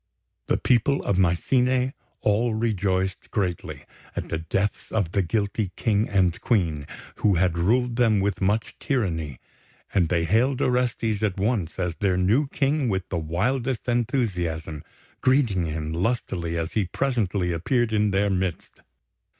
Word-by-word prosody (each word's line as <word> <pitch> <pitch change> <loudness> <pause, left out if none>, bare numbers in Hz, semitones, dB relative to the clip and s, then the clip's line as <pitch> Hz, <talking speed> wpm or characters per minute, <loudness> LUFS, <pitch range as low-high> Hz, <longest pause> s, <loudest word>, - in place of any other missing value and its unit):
The - - +2
people 130 +3 +2
of 100 - 0
Mycene 125 +9 +2 0.3
all 110 +2 +2
rejoiced 95 -4 -1
greatly 90 -5 -3 0.3
at - - -4
the 80 - -2
deaths 100 +5 -2
of 100 -7 0
the 100 - +2
guilty 100 +2 -1
King 110 -1 +1
and 90 -3 +2
Queen, 80 - 0 0.3
who 100 -3 +3
had 90 0 +2
ruled 120 +7 +1
them 115 -4 +4
with 100 0 -1
much 105 +3 0
tyranny; 85 - -2 0.5
and 90 -5 +2
they 85 -2 +1
hailed 120 - +2
Orestes 120 -4 0
at 100 -3 -1
once 100 -5 -1
as 90 -2 -1
their 95 -3 +2
new 110 +11 +2
King 140 -1 0
with 95 -2 -2
the 85 - -1
wildest 120 +11 -1
enthusiasm, 90 - -1 0.4
greeting 120 - +2
him 80 0 -3
lustily 85 -3 -1
as 80 +1 -2
he 105 -3 0
presently 100 -6 0
appeared 110 +8 0
in 105 -1 +3
their 100 +1 +1
midst. 95 -3 -3
100 Hz, 145 wpm, -25 LUFS, 90-120 Hz, 0.5 s, them